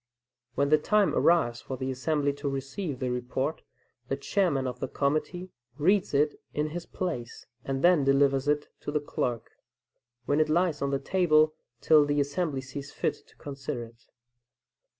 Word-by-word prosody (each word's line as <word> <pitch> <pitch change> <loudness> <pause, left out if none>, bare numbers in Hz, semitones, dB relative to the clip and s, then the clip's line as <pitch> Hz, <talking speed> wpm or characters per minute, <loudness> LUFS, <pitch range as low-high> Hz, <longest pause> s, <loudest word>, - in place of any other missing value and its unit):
When 140 +1 +1
the 155 0 +5
time 210 +5 +2
arrives 140 -9 +3
for 130 - -6
the 130 +1 -2
assembly 145 +2 0
to 140 0 -3
receive 135 +3 -4
the 125 -1 -2
report, 125 +4 -2 0.5
the 135 - -1
chairman 140 -2 0
of 125 -1 -4
the 135 - -2
committee 155 +7 -2 0.3
reads 185 +1 +2
it 150 +1 +1
in 150 +1 0
his 175 +1 -6
place, 140 -11 -5 0.2
and 135 0 -3
then 175 -4 +5
delivers 135 0 +3
it 150 0 +1
to - - -6
the 150 - +1
clerk, 120 -5 -3 0.7
when 145 +1 +1
it 155 - +2
lies 165 -1 +1
on 140 - 0
the 140 - +1
table 155 -2 +3 0.3
till 155 -2 +6
the 145 0 0
assembly 145 0 -1
sees 135 +2 -8
fit - - -1
to - - -23
consider 135 -3 -5
it. 115 +1 -16
145 Hz, 170 wpm, -28 LUFS, 135-155 Hz, 0.7 s, till